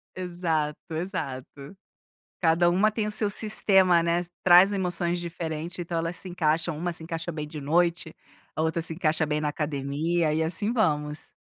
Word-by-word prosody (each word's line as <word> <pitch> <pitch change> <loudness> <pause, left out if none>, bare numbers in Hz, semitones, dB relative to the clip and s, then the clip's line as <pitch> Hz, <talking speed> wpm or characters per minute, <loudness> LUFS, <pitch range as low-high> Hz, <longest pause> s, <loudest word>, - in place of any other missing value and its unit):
Exato, 170 -4 -2 0.2
exato. 140 -3 -5 0.7
Cada 170 +1 +4
uma 205 +5 +3
tem 215 -1 -2
o - - -3
seu 210 -1 0
sistema, 190 -5 +3
né, 170 +1 +1 0.2
traz 185 +3 +7
emoções 175 -2 0
diferente, 170 0 -5
então 170 0 -3
elas 165 +1 -2
se 185 - -4
encaixam, 165 -2 0
uma 175 +2 -2
se 165 - -8
encaixa 165 +1 -4
bem 150 -1 -5
de 150 -1 -8
noite, 170 +2 +1 0.4
a 155 - -2
outra 160 +1 0
se 165 - -3
encaixa 160 -2 +1
bem 150 0 -1
na 150 - -1
academia, 150 +3 -1
e 160 +1 +1
assim 205 +8 -1
vamos. 150 -8 -1
170 Hz, 170 wpm, -26 LUFS, 155-180 Hz, 0.7 s, traz